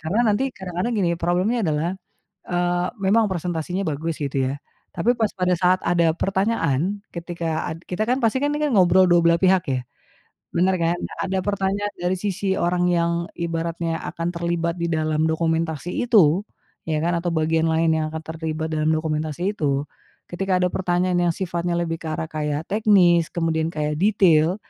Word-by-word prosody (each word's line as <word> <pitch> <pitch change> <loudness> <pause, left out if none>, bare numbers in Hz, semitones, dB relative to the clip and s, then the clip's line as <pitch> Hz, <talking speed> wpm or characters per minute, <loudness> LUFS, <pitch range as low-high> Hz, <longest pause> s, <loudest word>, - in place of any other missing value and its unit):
Karena 170 +8 -1
nanti 265 +5 -1
kadang-kadang 185 +4 -3
gini 190 -6 +1
problemnya 180 +8 0
adalah, 155 +2 0 0.6
eee, 175 0 0 0.2
memang 215 +2 +3
presentasinya 180 +1 -3
bagus 160 +1 -3
gitu 140 -2 -3
ya, - - -2 0.4
tapi 210 +7 +1
pas 220 -3 0
pada 180 0 +2
saat 180 +1 +3
ada 170 -1 +3
pertanyaan, 195 - 0 0.2
ketika 170 -2 -3
ad 160 - -5
kita 185 +4 -2
kan 255 - +3
pasti 245 +1 +1
kan 290 - +1
nih 300 +1 0
kan, - - -2
ngobrol 185 -1 +5
dua 175 -1 +4
belah 170 0 +4
pihak 185 -1 +4
ya, 130 -1 0 0.7
benar 185 +2 +2
kan? 170 0 0 0.3
Ada 190 0 -1
pertanyaan 200 +1 -1
dari 180 +1 -1
sisi 195 -1 -1
orang 175 +1 +1
yang 170 0 +2 0.2
ibaratnya 165 0 -2
akan 165 0 -3
terlibat 170 0 -1
di 170 - -2
dalam 155 0 0
dokumentasi 160 0 -1 0.2
itu, 195 -6 +4 0.4
ya 155 -1 -1
kan 170 +2 0
atau 175 - 0
bagian 160 0 +1
lain 165 +1 +2
yang 155 - 0
akan 160 - -4
terlibat 160 0 -4
dalam 155 0 0
dokumentasi 155 +5 -2
itu, 140 -1 -1 0.4
ketika 185 +1 -1
ada 180 - +2
pertanyaan 180 0 0
yang 170 - +2
sifatnya 175 -1 -3
lebih 165 -1 -2
ke 160 - -6
arah 160 - -2
kayak 150 -1 -3
teknis 190 -6 +4
kemudian 165 -1 0
kayak 150 -1 -2
detail 180 -3 +3
175 Hz, 170 wpm, -22 LUFS, 160-190 Hz, 0.7 s, ngobrol